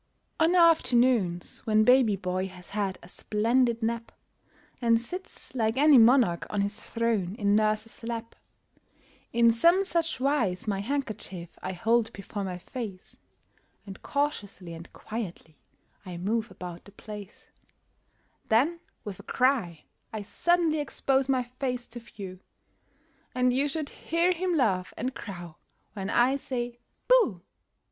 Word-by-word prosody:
On 325 +3 +4
afternoons, 250 - +3
when 215 0 +4
baby 250 -3 +5
boy 185 0 -2
has 180 -1 -13
had 200 -2 -1
a - - -12
splendid 230 +5 +1
nap, 230 +1 -2 0.7
And 230 -1 +4
sits, 365 - -9
like 225 -1 0
any 290 -2 +7
monarch 230 -7 +4
on 205 - 0
his 205 +2 -3
throne, 225 -5 -1
in 205 -2 +2
nurse's 215 +1 0
lap, 230 0 -4 1.0
In 235 0 +5
some 340 +11 +4
such 335 -5 -1
wise 250 -10 0
my 200 -2 0
handkerchief 205 -8 -4
I 185 - -4
hold 225 +5 +2
before 200 +1 -5
my 185 -2 -4
face, 200 -1 -8 0.7
And 195 -2 -10
cautiously 205 - -3
and 165 +1 -10
quietly 195 -8 -7 0.4
I 180 -3 -7
move 220 +5 -1
about 175 -1 -9
the 200 - -14
place; 210 -1 -10 1.0
Then, 285 +10 +3 0.2
with 200 -3 -7
a - - -11
cry, 240 - +1 0.3
I 215 -2 -4
suddenly 330 - +1
expose 270 -2 0
my 260 -2 +2 0.2
face 250 -3 -2
to 240 - -8
view, 195 -5 -9 1.0
And 250 0 +3
you 275 +3 +2
should 300 0 -3
hear 335 +3 0
him 360 0 0
laugh 185 - +1
and 255 +3 -2
crow 175 -7 -8 0.4
when 195 -2 -4
I 255 +5 +3
say 245 -3 -4 0.3
"Booh"! 455 - +4
230 Hz, 140 wpm, -28 LUFS, 195-265 Hz, 1.0 s, any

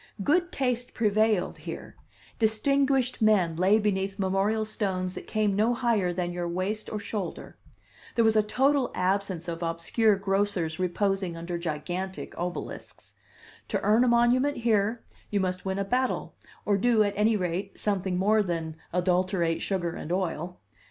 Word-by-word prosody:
Good 350 - +2
taste 250 -4 -2
prevailed 215 -3 +1
here; - - -8 0.4
distinguished 255 +3 +2
men 195 -7 +3
lay 190 +5 +4
beneath 195 -2 -1
memorial 200 +3 +1
stones 190 -4 -2
that - - -8
came 215 -2 +1
no 225 +4 +2
higher 225 -7 +1
than 175 0 -2
your 175 0 -3
waist 185 +5 -2
or 215 - -2
shoulder; 205 -3 -5 0.6
there 230 - +4
was 220 0 +4
a 215 - +6
total 265 +5 +2
absence 185 -2 -1
of 170 0 -4
obscure 170 +6 +2
grocers 195 -4 -1
reposing 185 -1 0
under 170 +1 -4
gigantic 175 +4 -4
obelisks; 175 0 -6 0.5
to - - -1
earn 220 +4 +4
a - - +3
monument 245 +4 +3
here 225 -1 +1 0.3
you 205 - 0
must 185 -1 -2
win 190 0 -1
a 200 - -1
battle, 255 +5 -1 0.3
or 205 -1 +2
do, 230 0 +4
at 205 -1 -1
any 215 +2 +3
rate, 185 +1 -3
something 190 -3 -1
more 210 +3 +3
than 165 -4 -3
adulterate 180 -1 +1
sugar 175 -4 -1
and 160 - -6
oil. 180 -1 -2
200 Hz, 150 wpm, -27 LUFS, 180-220 Hz, 0.6 s, a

